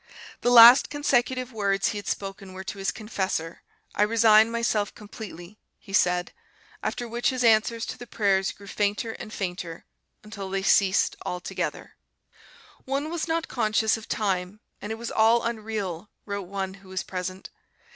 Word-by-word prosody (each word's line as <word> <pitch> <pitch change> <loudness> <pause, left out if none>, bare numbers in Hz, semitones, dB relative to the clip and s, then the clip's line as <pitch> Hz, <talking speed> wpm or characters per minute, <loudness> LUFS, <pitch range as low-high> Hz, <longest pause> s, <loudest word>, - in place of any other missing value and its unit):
The 245 - +2
last 240 +1 +9
consecutive 255 -3 0
words 200 -2 +1
he 205 - -3
had 205 - -10
spoken 195 -1 -5
were 190 0 -7
to 195 - -7
his 195 - -1
confessor; 190 -6 -3 0.3
"I - - -1
resign 220 0 +5
myself 230 -3 -1
completely," 210 -3 -10 0.2
he 195 - -14
said, 180 -2 +2 0.5
after 240 - -3
which 235 +1 0
his 255 -2 -1
answers 230 0 +3
to - - -7
the 245 - -9
prayers 195 -4 +1
grew 200 - -15
fainter 205 +3 -1
and 215 - -9
fainter 180 -4 -5 0.4
until 205 -2 -7
they 195 0 -2
ceased 195 -1 +3
altogether. 180 0 -5 0.9
"One 280 +4 -2
was 340 -1 -2
not 330 0 -1
conscious 220 -2 +1
of 225 -1 -9
time 195 -1 -1 0.2
and 205 - -5
it - - -2
was 235 +1 -6
all 225 +2 +4
unreal," 215 -5 -4 0.2
wrote 200 -3 -5
one 190 0 -4
who 190 - -17
was 190 0 -3
present. 185 0 -6
210 Hz, 160 wpm, -26 LUFS, 190-230 Hz, 0.9 s, last